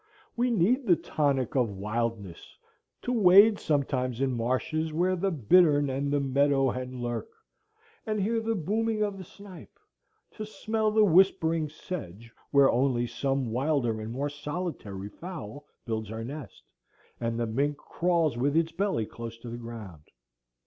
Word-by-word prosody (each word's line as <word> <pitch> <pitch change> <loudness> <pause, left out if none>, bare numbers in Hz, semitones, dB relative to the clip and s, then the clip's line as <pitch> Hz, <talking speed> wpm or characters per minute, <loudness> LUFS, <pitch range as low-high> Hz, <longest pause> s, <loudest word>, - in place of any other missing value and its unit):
We 245 +1 +1
need 235 +5 +2
the 175 - +6
tonic 140 -6 -1
of 125 -4 +2
wildness,—to 110 - -5
wade 205 0 +7
sometimes 130 -4 -1
in 135 -1 +1
marshes 130 +7 -1
where 180 +4 +1
the 195 +2 0
bittern 145 - +4
and 140 +2 -2
the 145 - +2
meadow 140 -1 +2
hen 125 0 -5
lurk, 120 0 -3 0.8
and 215 -1 -1
hear 225 +4 +1
the 225 0 -1
booming 215 +4 0
of 200 -2 -3
the - - -7
snipe; 195 0 -13 0.5
to 215 - -7
smell 215 0 -1
the 215 0 +4
whispering 165 -4 +3
sedge 115 - -8 0.2
where 140 -1 +5
only 125 -1 +1
some 135 +1 -2
wilder 125 -3 0
and 110 +1 -6
more 140 +4 -2
solitary 145 - -5
fowl 150 - -9 0.2
builds 110 -2 -3
her 110 +1 -5
nest, 140 0 -8 0.6
and 115 0 -2
the 120 - +1
mink 140 +6 -1
crawls 165 -7 0
with 140 +5 +1
its 165 0 +2
belly 185 - -1
close 115 +1 -8
to 115 +1 -9
the 120 - -6
ground. 110 -10 -9
145 Hz, 150 wpm, -28 LUFS, 120-180 Hz, 0.8 s, wade